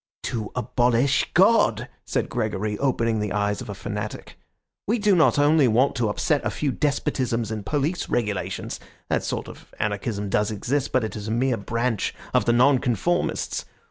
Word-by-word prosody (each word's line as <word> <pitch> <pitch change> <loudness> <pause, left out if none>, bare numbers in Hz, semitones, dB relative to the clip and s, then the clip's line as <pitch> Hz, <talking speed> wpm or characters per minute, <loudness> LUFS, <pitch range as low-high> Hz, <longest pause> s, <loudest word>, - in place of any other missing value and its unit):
"To 110 -3 -3
abolish 125 +2 +2
God!" 205 +6 +4 0.2
said - - -1
Gregory, 110 -3 -2
opening 115 -5 +1
the 105 -2 -2
eyes 105 0 0
of - - -8
a 100 - -5
fanatic. 105 +2 -6 0.5
"We 225 +4 +2
do 205 -3 +3
not 160 -3 +4
only 145 -1 +5
want 125 +5 +3
to 115 -3 +1
upset 145 +7 0
a - - 0
few 145 -2 -1
despotisms 125 -5 -1
and 110 -2 -4
police 150 - -1
regulations; 105 -5 -2 0.3
that - - +1
sort - - -3
of - - -13
anarchism 105 0 -2
does 105 +1 +1
exist, 125 +7 -1
but 130 - +2
it 110 - -4
is 105 0 -6
a - - -2
mere 125 +2 +1
branch 115 +2 -1 0.2
of - - +3
the 120 - +3
Nonconformists. 130 - +1
120 Hz, 170 wpm, -24 LUFS, 105-140 Hz, 0.5 s, only